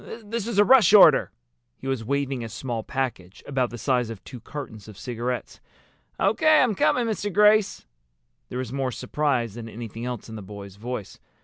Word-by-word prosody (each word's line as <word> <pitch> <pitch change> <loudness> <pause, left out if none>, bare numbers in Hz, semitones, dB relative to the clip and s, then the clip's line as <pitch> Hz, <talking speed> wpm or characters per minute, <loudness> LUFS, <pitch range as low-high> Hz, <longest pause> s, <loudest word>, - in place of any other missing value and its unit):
This 225 +1 -3
is 235 -4 -3
a 205 - +6
rush 245 -2 +6
order!" 210 - +7 0.5
He - - -13
was 135 -4 -1
waving 135 0 -1
a 115 - -6
small 120 0 -4
package, 115 -8 -4
about 130 -3 0
the 120 - -8
size 125 -1 0
of 110 -3 -8
two 125 - -10
cartons 115 -5 -8
of 105 -3 -12
cigarettes. 120 +2 -4 0.6
"O.K. 310 -3 +4
I'm 240 -4 +1
coming, 235 +4 +2
Mr. 210 -2 -2
Grace." 210 - +4 0.6
There 125 - -5
was 130 -1 -4
more 135 -2 -1
surprise 130 -5 -1
than 115 0 -8
anything 115 0 -7
else 125 -2 -5
in 110 - -8
the 110 - -7
boy's 100 0 -10
voice. 115 -2 -6
125 Hz, 185 wpm, -25 LUFS, 115-175 Hz, 0.6 s, order